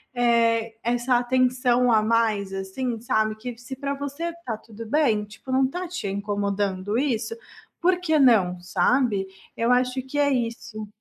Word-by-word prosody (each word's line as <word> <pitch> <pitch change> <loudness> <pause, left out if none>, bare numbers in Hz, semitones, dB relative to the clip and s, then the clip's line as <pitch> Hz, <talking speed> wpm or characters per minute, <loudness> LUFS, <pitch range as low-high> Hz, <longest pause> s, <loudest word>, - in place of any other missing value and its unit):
eh, 230 -2 +2
essa 245 +2 +1
atenção 250 0 +2
a 220 -1 +5
mais, 215 -3 +1
assim, 205 +5 -3
sabe, 215 -2 +1
que 240 +2 -7
se 245 +2 -7
para 280 +1 -3
você 285 +3 -5
está 335 -10 -6
tudo 225 +1 -11
bem, 235 -7 +2
tipo, 215 +5 -10
não 265 +1 +3
está 355 +7 -4
te 360 - -5
incomodando 200 0 -1
isso, 270 - -1 0.4
por 360 +1 +2
que 315 -4 +1
não, 205 -10 +4
sabe? 205 +2 +1 0.3
Eu 230 +1 +1
acho 250 +1 +2
que 265 +3 -7
é 285 -1 +3
isso. 230 -3 -3
240 Hz, 160 wpm, -24 LUFS, 215-260 Hz, 0.4 s, a